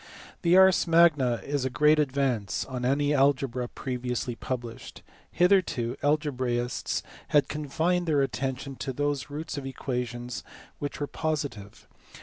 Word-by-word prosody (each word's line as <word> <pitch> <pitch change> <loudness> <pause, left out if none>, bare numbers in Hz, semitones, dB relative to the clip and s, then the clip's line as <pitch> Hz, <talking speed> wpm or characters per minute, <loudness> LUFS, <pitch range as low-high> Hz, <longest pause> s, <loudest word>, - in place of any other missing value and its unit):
The 175 0 +5
Ars 190 -1 +6
Magna 165 -7 +5
is 140 -2 -1
a 130 - 0
great 150 +4 +4
advance 130 -7 0
on 130 -2 -5
any 145 +3 +2
algebra 135 -3 +2
pre 125 0 -5
viously 125 -1 -2
published. 120 -3 -6 0.3
Hitherto 175 -10 +2
algebraists 130 -5 -1 0.2
had 145 -1 +3
confined 160 +4 -1
their 145 -3 +3
attention 135 +2 -3
to 135 - -4
those 145 +1 -1
roots 150 +1 -5
of 135 - -8
equations 125 -4 -4 0.4
which 145 - -4
were 145 - -1
positive. 145 -10 -4
140 Hz, 130 wpm, -27 LUFS, 125-150 Hz, 0.4 s, Ars